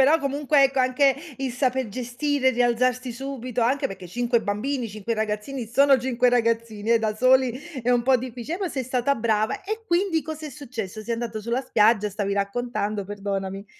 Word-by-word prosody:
Però 295 +5 +5
comunque, 285 0 +2
ecco, 270 0 +1
anche 260 +2 +3 0.2
il 265 -2 -2
saper 255 -1 0
gestire 255 +5 0
e - - +5
rialzarsi 250 +1 +1
subito, 255 -1 -4
anche 255 +5 +2
perché 190 -2 -9
5 240 +5 +1
bambini, 230 +5 -2
5 215 +2 -4
ragazzini 220 +4 -3
sono 275 +4 +4
5 250 0 +2
ragazzini, 230 -2 0
eh, 230 - +5
da 220 -1 -1
soli 255 +2 +4 0.3
è 245 - +1
un 245 -1 +3
po' 260 +1 +4
difficile! 250 +6 -5
Però 380 -2 -2
sei 265 - -2
stata 255 +2 +1
brava! 220 -2 0
E 435 +3 -5
quindi 345 -3 +1
cosa 315 -1 -6
è - - -7
successo? 230 -8 -6
Sei 230 +2 -3
andata 230 -1 -3
sulla 235 +4 -1
spiaggia 215 -3 +3
stavi 200 0 -2
raccontando, 205 0 -2
perdonami. 195 0 -4
245 Hz, 185 wpm, -24 LUFS, 215-265 Hz, 0.3 s, Però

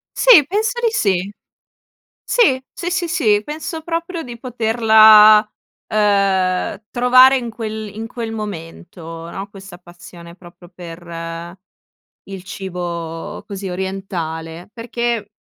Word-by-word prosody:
Sì, 455 - +7
penso 435 +5 -1
di 470 - +2
sì. 195 - 0 0.9
Sì, 325 - +2
sì, 350 0 -5
sì, 355 -1 -1
sì, 240 - +2
penso 315 +3 -6
proprio 335 +1 -4
di 240 -2 -9
poterla, 220 -3 +6 0.5
uhm, 200 -2 0
trovare 255 +2 +5
in 240 -2 -5
quel 220 -1 -6
in 220 +1 -5
quel 225 -1 -6
momento, 165 -4 -8
no, 195 +1 -7
questa 195 -3 -12
passione 175 -1 -14
proprio 175 -1 -16
per, 175 -1 -11
ehm, 165 +1 -7 0.7
il 195 -2 -9
cibo 175 -1 -6
così 195 -1 -6
orientale, 175 -3 -5
perché 235 -2 -3
205 Hz, 115 wpm, -18 LUFS, 175-240 Hz, 0.9 s, Sì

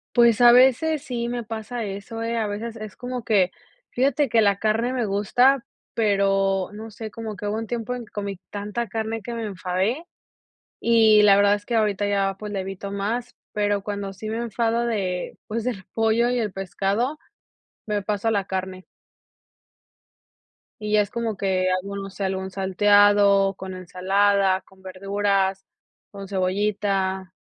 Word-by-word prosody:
Pues 235 -2 +5
a 240 0 +9
veces 265 +5 +4
sí 235 -2 -3
me 240 -1 -3
pasa 225 +2 -5
eso, 205 +3 -6
eh, 230 +1 -2
a 220 -2 0
veces 220 +3 -5
es 215 -2 -8
como 250 -1 -5
que, 195 -6 +2 0.4
fíjate 275 +3 +2
que 225 -1 +3
la 200 -2 +3
carne 220 +4 0
me 250 -3 -1
gusta, 235 +6 +3 0.3
pero 195 -3 +1
no 220 +2 -8
sé, 220 0 -8
como 220 -2 -6
que 205 - -7
hubo 210 +1 -1
un 225 -1 -4
tiempo 240 +1 -3
en 245 -2 -6
que - - -23
comí 200 -2 -5
tanta 210 +3 -4
carne 220 +2 -3
que 235 +3 -6
me 230 - -4
enfadé, 195 - -2 0.8
y 220 -2 +5
la 200 -1 +6
verdad 205 0 +5
es 205 - -9
que 235 - -2
ahorita 210 -2 +1
ya, 195 -1 +1
pues, 210 0 -7
la 200 - -2
evito 195 +1 -6
más, 225 +5 -3 0.2
pero 205 -1 0
cuando 200 -1 -4
sí 215 +3 -8
me 220 - -2
enfado 235 0 0
de 190 -6 -2
pues 225 +1 -3
del 215 -6 -4
pollo 225 +2 +2
y 250 0 0
el 215 -3 -1
pescado, 195 +9 -2 0.7
me 210 -1 -1
paso 205 +2 -2
a - - +3
la 200 -3 0
carne 185 0 -4 2.0
y 210 0 -3
ya 210 - +6
es 205 0 -4
como 230 -3 -2
que 185 -1 0
algo 200 +1 -6
no 195 0 -5
sé, 195 +1 -6
algún 190 0 -3
salteado, 200 +1 +4
con 190 0 -7
ensalada, 190 +1 +1
con 190 0 -23
verduras, 195 0 -1 0.5
con 200 -1 -8
cebollita, 190 -1 -1
205 Hz, 175 wpm, -24 LUFS, 195-230 Hz, 2.0 s, a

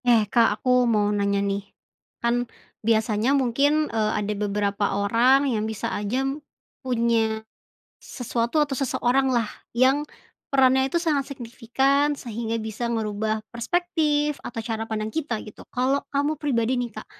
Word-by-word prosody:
Eh, 230 -3 +5
Kak 235 -2 +5
aku 250 +1 +3
mau 210 -2 +2
nanya 200 -1 +1
nih, 200 0 -1 0.6
kan 240 0 +1 0.3
biasanya 220 +3 +2
mungkin, 280 +4 +2
eee, 215 -1 +1
ada 210 0 -1
beberapa 205 0 -1
orang 240 +7 +4
yang 220 -5 0
bisa 220 -2 -3
aja, 225 +6 -1 0.6
punya, 230 -3 0 0.6
sesuatu 240 +3 -1
atau 290 -2 +1
seseoranglah 255 -2 +1 0.2
yang, 260 +4 +3 0.5
perannya 265 -1 +4
itu - - +2
sangat 300 -5 0
signifikan 270 +3 0
sehingga 230 -1 -3
bisa 220 +2 -4
ngerubah 215 -1 -2
perspektif 300 +2 0
atau 230 - -5
cara 225 -1 -3
pandang 215 0 -3
kita 300 -8 -2
gitu 210 - -12
kalau 265 +3 +1
kamu 290 +2 -1
pribadi 250 -5 +1
nih 245 -1 -1
Kak 215 0 -9
235 Hz, 135 wpm, -24 LUFS, 220-270 Hz, 0.6 s, Eh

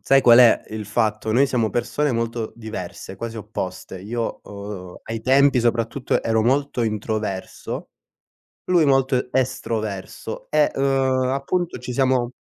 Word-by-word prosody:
sai 135 0 +4
qual 120 -1 +7
è 120 -2 +7
il 110 -1 -6
fatto? 110 0 0
Noi 135 +5 +4
siamo 115 -5 0
persone 135 +4 0
molto 115 -1 -2
diverse, 110 -4 -7
quasi 115 +3 -5
opposte. 95 -3 -6
Io, 115 +4 -3
uhm, 100 -3 -8
ai 115 0 -4
tempi 135 +1 +4
soprattutto 120 +2 0
ero 110 -1 +2
molto 135 +1 +1
introverso, 105 -3 -3 0.8
lui 175 -3 +4
molto 135 -2 +2
estroverso 110 -6 -3
e, 150 -1 +3
uhm, 135 -1 +2
appunto 165 +6 -1
ci 125 +1 -6
siamo 130 -1 +2
120 Hz, 135 wpm, -22 LUFS, 110-130 Hz, 0.8 s, qual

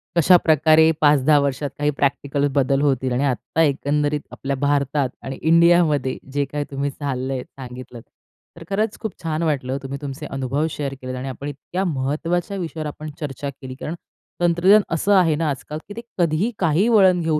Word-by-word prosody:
कशाप्रकारे 160 -2 +5
5-10 145 0 +5
वर्षात 140 0 -1
काही 145 0 +2
प्रॅक्टिकल 140 0 +1
बदल 135 0 +2
होतील. 130 -3 +1
आणि 125 +3 0
आत्ता 140 +4 -1
एकंदरीत 145 0 +1
आपल्या 140 0 -3
भारतात 140 0 0
आणि 135 0 -5
इंडियामध्ये 165 -5 +4 0.2
जे 145 0 +1
काही 145 +1 -4
तुम्ही 140 +1 -1
चाललंय 130 -2 -3
सांगितलं, 125 -2 -10 0.6
तर 170 - -9
खरंच 205 +2 -1
खूप 220 -2 -4
छान 160 0 -1
वाटलं. 135 -4 -1
तुम्ही 135 +1 -5
तुमचे 145 +1 -6
अनुभव 135 +2 -2
शेअर 145 -3 -4
केलेत 130 0 -5
आणि 130 +1 -5
आपण 135 +2 -7
इतक्या 145 +6 -4
महत्त्वाच्या 165 +6 -1
विषयावर 160 -4 -4
आपण 150 +1 -7
चर्चा 145 -2 -4
केली 130 -1 -9
कारण, 150 +5 -5 0.5
तंत्रज्ञान 175 +5 +5
असं 200 +5 +2
आहे 170 -5 +4
ना 160 0 0
आज-काल, 145 +2 -5
की 205 - -8
ते 230 - -6 0.2
कधीही 170 +5 +1
काही 170 +4 +2
वळण 190 -6 +5
घेऊ 160 -2 +1
145 Hz, 170 wpm, -21 LUFS, 135-165 Hz, 0.6 s, कशाप्रकारे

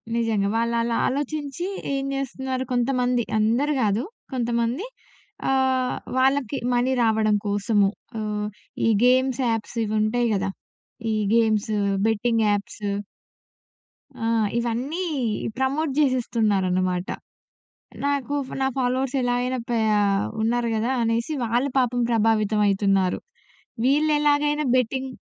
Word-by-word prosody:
నిజంగా. 220 -4 +1
వాళ్ళలా 235 0 0
ఆలోచించి 290 +3 -3 0.3
ఏం 270 0 -2
చేస్తున్నారు 265 -1 -3
కొంతమంది 250 0 +1 0.2
అందరు 240 +8 +2
కాదు. 210 +3 +1 0.3
కొంతమంది. 240 - -1 0.6
ఆహ్, 260 -1 +1 0.2
వాళ్ళకి 270 0 +2 0.2
మనీ 245 +2 +2
రావడం 220 -1 +3
కోసము 205 0 +2 0.3
ఆహ్, 210 -1 -2 0.4
ఈ - - +4 0.2
గేమ్స్ 260 +1 +3
యాప్స్ 225 +1 -3
ఇవి 215 0 -3
ఉంటాయి 240 +3 +1
కదా! 195 0 -1 0.6
ఈ - - +1 0.2
గేమ్సు 220 -2 +2 0.3
బెట్టింగ్ 225 +1 +1
యాప్సు. 205 0 -2 1.3
ఆ! - - 0 0.3
ఇవన్నీ 245 +9 -2 0.6
ప్రమోట్ 275 +3 0
చేసేస్తున్నారనమాట. 195 -9 +1 1.0
నాకు 285 0 -1
ఫ - - -6
నా 265 - +2
ఫాలోవర్స్ 260 +1 0
ఎలా 245 -1 +1
అయినా 255 +1 -1
ప్యా 220 -3 +2 0.4
ఉన్నారు 235 +1 +1
కదా! 225 +3 0
అనేసి 230 +5 0
వాళ్ళు 240 +4 0
పాపం 245 -1 +1
ప్రభావితం 220 -2 +2
అయితున్నారు. 195 -2 +2 0.7
వీళ్ళెలాగైనా 295 +1 +2
బెట్టింగ్ 260 +2 0
240 Hz, 105 wpm, -24 LUFS, 220-265 Hz, 1.3 s, ఈ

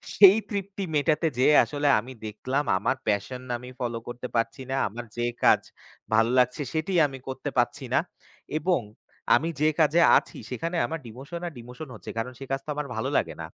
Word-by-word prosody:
সেই 200 +1 +9
তৃপ্তি 200 -1 -4
মেটাতে 155 +2 +2
যেয়ে 145 +4 +5
আসলে 145 0 -1
আমি 125 +4 -8
দেখলাম, 130 +7 -2
আমার 130 - 0
প্যাশন 105 +5 -1 0.2
আমি 125 +1 -10
ফলো 120 -2 -2
করতে 120 +1 -5
পারছি 115 +3 0
না, - - 0
আমার 120 +4 -7
যে 120 - 0 0.2
কাজ - - +6 0.5
ভালো 115 +1 +4
লাগছে 125 +4 +2
সেটিই 165 +3 +1
আমি 135 -1 -8
করতে 135 +2 -4
পারছি 120 +3 +1
না, - - +5 0.6
এবং 175 -3 +1 0.5
আমি 165 +3 +1
যে 155 - +5
কাজে 160 +2 +4 0.2
আছি - - -4
সেখানে 165 +7 -3
আমার 165 0 -4
ডিমোশন 140 +9 -8
আর 165 - -7
ডিমোশন 125 +5 -9
হচ্ছে, - - -8
কারণ 120 +3 -2
সে 135 - -7
কাজ 135 - +1
তো - - -10
আমার 150 -1 -3
ভালো 110 +4 -1
লাগে 80 - 0
না। - - -4
135 Hz, 190 wpm, -26 LUFS, 120-155 Hz, 0.6 s, সেই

